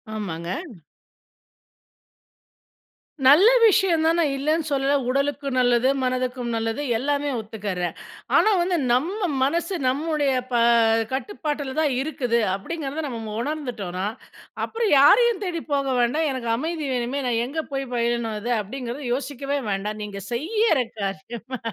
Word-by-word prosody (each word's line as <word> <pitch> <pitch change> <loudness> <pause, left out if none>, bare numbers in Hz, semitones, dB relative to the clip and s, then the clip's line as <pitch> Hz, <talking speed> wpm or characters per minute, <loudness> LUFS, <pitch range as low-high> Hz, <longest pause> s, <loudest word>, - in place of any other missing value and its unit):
ஆமாங்க. 170 -5 -5 2.8
நல்ல 300 - +8 0.2
விஷயம் 385 -6 +4
தான், 330 +1 +3
நான் 300 -5 +2
இல்லைன்னு 305 +3 0
சொல்லல! 275 0 +2
உடலுக்கு 280 +1 -1
நல்லது, 245 0 +3 0.2
மனதுக்கும் 250 -1 -1
நல்லது 225 +4 -2 0.2
எல்லாமே 285 +3 -1
ஒத்துக்கறேன். 200 -6 -4 0.4
ஆனா - - +5
வந்து, 350 0 +1
நம்ம 355 - 0
மனசு 335 +6 0
நம்முடைய, 290 +1 +1 0.2
ப - - 0 0.6
கட்டுப்பாட்டுல 290 -3 -3
தான் 300 -3 +2
இருக்குது 250 -5 0 0.2
அப்டிங்கறத 280 +7 -5
மு - - -4
நம்ம 225 -4 -5
உணர்ந்துட்டோன்னா, 235 - -4 0.6
அப்புறம் 455 -1 -1
யாரையும் 440 - +5
தேடி 340 -3 -3
போக 275 -1 +1
வேண்டாம், 300 +7 +1
"எனக்கு 250 -3 -4
அமைதி 315 +3 -3
வேணுமே, 250 +3 -2
நான் 230 -1 +1
எங்க 315 +5 -3
போயி 270 0 -2
பயிலனும் 235 -1 0
அத" 230 +4 -3
அப்டிங்கறத 250 +5 -6
யோசிக்கவே 280 +1 -3
வேண்டாம் 210 +2 -3
நீங்க 200 -1 -7
செய்யற 345 - +1 0.2
காரியமா? 225 +6 -5
270 Hz, 125 wpm, -23 LUFS, 235-310 Hz, 2.8 s, நல்ல